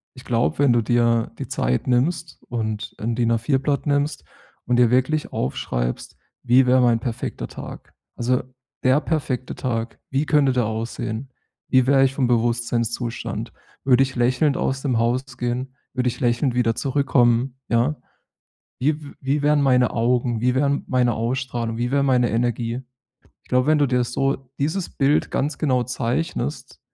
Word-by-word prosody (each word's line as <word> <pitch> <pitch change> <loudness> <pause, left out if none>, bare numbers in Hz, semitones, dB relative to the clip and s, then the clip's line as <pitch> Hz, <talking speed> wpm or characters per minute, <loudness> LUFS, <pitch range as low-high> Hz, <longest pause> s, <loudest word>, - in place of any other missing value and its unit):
ich 130 - -13
glaube, 120 +2 0
wenn 140 -4 +5
du 120 - +3
dir 115 0 +2
die - - -4
Zeit 60 +1 -1
nimmst 155 +6 0
und 110 -3 -3
'n 115 +2 -2
DIN-A4-Blatt 125 +5 0
nimmst 145 0 0 0.4
und 120 0 +1
dir 120 -1 +5
wirklich 130 +5 +1
aufschreibst: - - -3 0.3
„Wie 125 +1 +5
wäre 130 +1 +4
mein 120 -2 +3
perfekter 115 +1 -4
Tag?” - - -10 0.2
Also, 125 +1 +1 0.4
der 130 +2 +4
perfekte 140 -6 -2
Tag, 115 -2 -3
wie 135 +3 0
könnte 145 -3 +3
der 125 -2 +1
aussehen? 110 +3 -4 0.4
Wie 130 -1 +4
wäre 135 0 +5
ich 135 0 +2
vom 135 -2 +1
Bewusstseinszustand? 120 0 -1 0.3
Würde 130 0 +5
ich 135 0 -4
lächelnd 130 +4 +2
aus 135 0 -1
dem 130 -5 0
Haus 120 +2 -1
gehen? 125 +2 -3 0.2
Würde 125 -1 +1
ich - - -7
lächelnd 120 +1 +1
wieder 115 -2 +2
zurückkommen, 130 -2 +1
ja? 120 +6 +2 0.8
Wie 150 +4 0
w 145 - -10
wie 140 +2 0
wären 150 0 +3
meine 125 -3 +3
Augen? 120 0 0
Wie 125 +1 +2
wäre 140 +1 +1
meine 125 -2 +2
Ausstrahlung? 115 0 -2
Wie 120 +1 -1
wäre 140 0 +2
meine 125 -3 +3
Energie? 120 +1 -1 0.6
Ich - - -26
glaube, 125 +2 +2
wenn 155 0 +4
du 145 - +3
dir 125 -1 +1
das 120 0 -1
so 135 +2 +1 0.2
dieses 160 +6 -1
Bild 140 +2 +1
ganz 145 +1 -1
genau 130 -5 +1
zeichnest, 130 +3 -3
125 Hz, 165 wpm, -22 LUFS, 120-135 Hz, 0.8 s, wenn